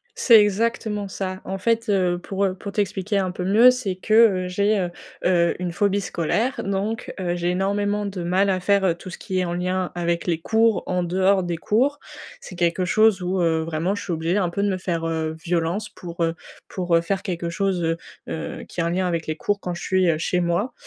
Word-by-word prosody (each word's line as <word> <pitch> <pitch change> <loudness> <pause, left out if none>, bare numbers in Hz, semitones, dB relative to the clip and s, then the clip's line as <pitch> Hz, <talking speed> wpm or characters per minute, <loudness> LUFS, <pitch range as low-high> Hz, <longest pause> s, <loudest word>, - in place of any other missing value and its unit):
C'est 235 - +7
exactement 210 0 0
ça. 190 -1 -5
En 190 0 -4
fait, 230 +2 0
heu, 180 -3 +2
pour, 195 +2 -2
heu, 185 -1 0
pour 200 +1 -8
t'expliquer 200 0 -1
un 185 -2 0
peu 180 0 -5
mieux, 220 +7 +7
c'est 250 -7 -2
que, 210 -1 +4
heu, - - -4
j'ai, 200 +3 +1
heu 175 -2 -1 0.3
heu, 175 -1 +3
une 180 -1 -2
phobie 200 +2 +1
scolaire. 200 +8 -1
Donc, 200 +3 -2
heu, 175 -1 -1
j'ai 175 0 0
énormément 205 +2 0
de 195 -3 -5
mal 190 +3 +2
à 185 - +1
faire, 200 +1 +2
heu, 175 - +3
tout 180 +2 -10
ce - - -8
qui 185 -1 -3
est 185 - +1
en 175 0 -3
lien 185 +1 -1
avec 170 0 -1
les 165 -2 0
cours, 225 +3 +2
en 180 -1 0
dehors 190 +2 +2
des 175 -1 -2
cours. 260 - +1 0.4
C'est 180 - -10
quelque 175 +1 +1
chose 215 +1 +3
où, 180 +1 -1
heu, 165 -1 +2
vraiment 165 +4 -1
je 205 - -5
suis 180 - -4
obligée 165 +4 0
un 180 -3 0
peu 200 +4 -2
de 205 - +2
me 190 - -1
faire, 170 -3 -2
heu 160 -1 -2
violence 175 +5 -1
pour, 170 -4 -7
heu 165 0 0 0.3
pour, 175 -2 0
heu, - - +4
faire 190 +3 -2
quelque 170 -3 -3
chose, 185 0 -1
heu 165 0 +1 0.3
heu, 160 - -5
qui 175 - -5
a 165 - +1
un 170 - 0
lien 185 +1 0
avec 170 -2 -2
les 155 - -2
cours, 205 +4 -1
quand 180 -1 -4
je 175 - -7
suis, 185 -1 +2
heu, 155 - 0
chez 180 +2 0
moi. 175 +8 0
185 Hz, 235 wpm, -23 LUFS, 175-200 Hz, 0.4 s, C'est